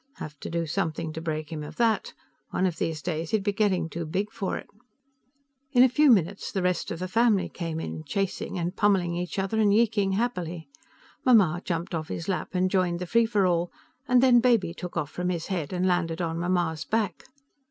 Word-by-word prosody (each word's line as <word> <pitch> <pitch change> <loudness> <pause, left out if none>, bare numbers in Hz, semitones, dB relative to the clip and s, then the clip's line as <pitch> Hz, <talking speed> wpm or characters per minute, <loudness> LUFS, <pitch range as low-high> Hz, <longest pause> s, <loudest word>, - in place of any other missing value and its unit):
Have 150 -1 -8
to - - -6
do 170 0 -1
something 160 -1 -2
to 160 - -5
break 155 -2 -4
him 155 -2 -4
of 150 - -8
that. 230 -2 +1 0.3
One 185 - 0
of 175 -3 -1
these 155 -2 -2
days, 160 -2 -3
he'd 215 -3 +1
be 205 0 0
getting 195 -5 +1
too 170 +1 -5
big 195 +6 -2
for 195 - -3
it. - - -9 1.1
In 250 -1 +7
a 260 - +6
few 295 +4 +4
minutes, 195 -4 +2
the 190 - -1
rest 180 -1 0
of 165 - -4
the 185 +2 -4
family 220 -1 +3
came 165 -2 -4
in, 80 - -5
chasing 195 - -2
and 175 +2 -2
pummeling 190 -4 +2
each 175 +2 -4
other 195 +3 0
and 210 -2 +4
yeeking 205 -3 +2
happily. 180 -7 -2 0.6
Mamma 190 -9 +4
jumped 175 +1 -3
off 160 -2 -2
his 165 - -5
lap 190 0 -3
and 185 0 +2
joined 180 -3 +1
the 180 - -4
free 230 +5 +3
for 205 -4 +2
all, 175 -1 +1 0.4
and 250 -1 +4
then 250 -2 +7
Baby 230 -8 +2
took 180 0 -7
off 150 -2 -2
from 180 0 -2
his 170 -2 -2
head 160 -6 -3
and 180 0 0
landed 175 -2 0
on 165 -1 -2
Mamma's 175 -3 0
back. 210 -6 -1
180 Hz, 215 wpm, -27 LUFS, 165-205 Hz, 1.1 s, In